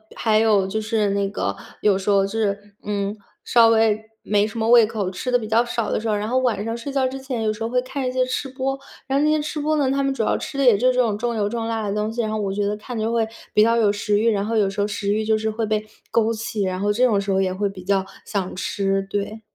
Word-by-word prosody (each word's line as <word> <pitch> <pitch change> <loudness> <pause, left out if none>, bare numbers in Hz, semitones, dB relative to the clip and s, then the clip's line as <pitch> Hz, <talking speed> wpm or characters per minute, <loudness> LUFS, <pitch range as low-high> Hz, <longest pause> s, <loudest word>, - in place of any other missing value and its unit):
还 215 -1 +2
有 210 -4 +3
就 220 +3 -2
是 215 -1 0
那 200 0 0
个， 205 - -2 0.3
有 205 -2 +4
时 195 +1 -3
候 195 -1 +4
就 195 - -6
是， 205 -1 -2
嗯， 205 0 -2 0.3
稍 230 -1 +5
微 220 -1 +3 0.2
没 210 0 +2
什 230 - -8
么 220 0 0
胃 240 -1 +8
口， 205 -4 -3
吃 250 +7 -4
得 245 - +5
比 220 -3 -6
较 225 +2 +3
少 235 -2 -2
的 - - 0
时 225 0 -3
候， 210 - +2
然 210 +1 -2
后 255 +2 +2
晚 225 -6 0
上 225 0 -2
睡 255 +4 -6
觉 265 -2 +1
之 270 +1 -5
前 255 -4 -4
有 215 0 +1
时 220 - -12
候 225 - -1
会 250 +1 +2
看 260 0 -3
一 - - -1
些 255 0 +1
吃 260 +1 -3
播， 270 +1 -3 0.3
然 270 +1 +1
后 - - +2
那 305 - +3
些 310 0 +3
吃 300 +1 -4
播 310 +1 +1
呢， 270 -2 +2
他 275 0 +1
们 275 0 +1
主 240 -5 -1
要 - - +1
吃 275 - -6
的 275 - +2
也 235 -4 +7
就 250 +6 +2
是 255 - +3
这 - - +1
种 220 -4 +1
重 235 +1 -2
油 205 -2 0
重 230 +1 -3
辣 225 -2 -2
的 200 - -1
东 210 +1 -1
西， 235 +1 -2
然 215 -1 -2
后 215 - -1
我 195 -2 -1
觉 205 +1 -1
得 205 +1 0
看 235 +2 -7
着 220 +1 -1
会 225 -1 +1 0.3
比 210 - +5
较 230 +1 +4
有 215 -3 +3
食 205 0 0
欲， 230 +1 +3
然 200 -1 0
后 225 +1 -1
有 205 -2 +3
时 195 +1 -2
候 205 - +1
食 200 0 -1
欲 215 +1 0
就 220 0 +2
是 220 0 -1
会 225 +1 -3
被 215 0 -1 0.2
勾 230 0 +2
起， 220 -2 -3
然 185 -1 -2
后 205 0 +2
这 245 +5 +3
种 205 -5 +2
时 200 - -6
候 190 0 +2
也 185 -1 +1
会 200 +1 -1
比 185 -2 -10
较 195 0 +1 0.2
想 190 -4 -3
吃， 195 +1 -1
对。 205 +2 -3
220 Hz, 330 characters per minute, -22 LUFS, 205-240 Hz, 0.3 s, 胃